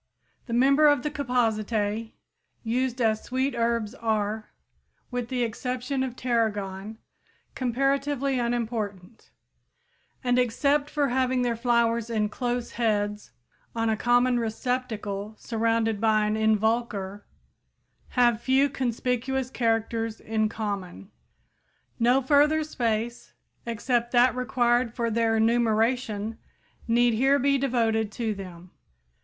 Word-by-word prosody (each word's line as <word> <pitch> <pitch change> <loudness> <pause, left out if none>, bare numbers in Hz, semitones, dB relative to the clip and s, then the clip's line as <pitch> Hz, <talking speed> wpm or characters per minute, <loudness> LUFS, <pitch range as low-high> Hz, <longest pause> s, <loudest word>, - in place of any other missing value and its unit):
The 235 - -4
members 275 +5 +5
of 270 - -4
the 300 - -2
Compositæ 225 -5 -1 0.5
used 250 +2 -1
as 220 -2 +1
sweet 260 +2 -1
herbs 230 -2 0
are, 220 -3 -2 0.6
with 245 -1 -3
the 250 -2 0
exception 250 +3 -3
of 260 -2 -3
tarragon, 215 -4 -2 0.6
comparatively 275 +1 0
unimportant, 225 -4 -3 0.9
and 245 0 +2
except 285 +4 +1
for 290 -2 0
having 255 0 +1
their 240 -1 0
flowers 235 -1 +1
in 215 -2 0
close 245 +1 -3
heads 210 -3 -1 0.5
"on 225 -1 +1
a - - +1
common 245 +2 +3
receptacle, 220 -3 -3
surrounded 225 -2 0
by 215 -1 +3
an 210 - 0
involucre," 220 -2 0 1.0
have 240 -2 +4
few 270 +3 +3
conspicuous 255 0 -2
characters 225 -2 -1
in 220 -1 -1
common. 200 -3 -5 0.9
No 250 +3 +3
further 300 +3 +4
space 235 -5 -3 0.3
except 235 +1 -1
that 245 +1 +5
required 240 -1 +1
for 235 -2 -1
their 225 0 +2
enumeration 225 -1 +1 0.5
need 240 +1 +3
here 270 +5 +3
be 275 +1 +2
devoted 225 -5 +1
to 225 -1 -2
them. 180 -3 -10
235 Hz, 115 wpm, -26 LUFS, 220-250 Hz, 1.0 s, members